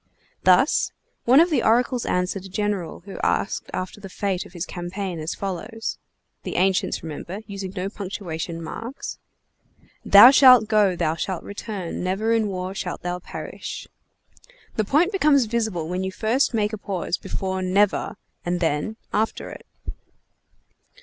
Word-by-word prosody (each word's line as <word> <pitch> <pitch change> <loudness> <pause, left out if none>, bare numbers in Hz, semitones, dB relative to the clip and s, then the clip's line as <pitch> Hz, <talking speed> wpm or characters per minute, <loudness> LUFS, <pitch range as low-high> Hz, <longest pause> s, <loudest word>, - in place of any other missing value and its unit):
Thus, - - +4 0.3
one 255 +4 +7
of 340 +2 +4
the 275 -6 +3
oracles 240 +2 +2
answered 180 +1 -1
a - - -9
general 195 -4 -2
who 195 - -9
asked 205 - 0
after 185 +3 -5
the 195 - -8
fate 190 -1 -2
of - - -20
his 175 0 -4
campaign 180 0 -5
as 155 +1 -3
follows: 210 +4 -4 0.4
(the - - -5
ancients, 190 +1 +1
remember, 165 +5 -6
using 200 -2 -6
no 185 0 -2
punctuation 175 -5 -5
marks) 230 - -6 0.8
"Thou 210 +6 +10
shalt 255 -5 +8
go 210 -4 +3
thou 155 -2 0
shalt 170 +2 -3
return 200 -4 -5
never 200 +5 0
in 225 -2 +2
war 185 -1 -4
shalt 180 -2 -5
thou 180 0 -2
perish." - - -7 0.9
The 215 - +1
point 315 - +3
becomes 295 - +4
visible 220 -8 -1
when 180 +2 -2
you 190 - -2
first 230 +7 +1
make 215 -2 0
a 215 - -4
pause 185 -3 -2
before 190 -1 -3
"never," 195 +2 +1 0.3
and 175 0 -1
then 165 +5 0 0.2
after 220 +2 -1
it. - - -11
195 Hz, 150 wpm, -23 LUFS, 180-220 Hz, 0.9 s, Thou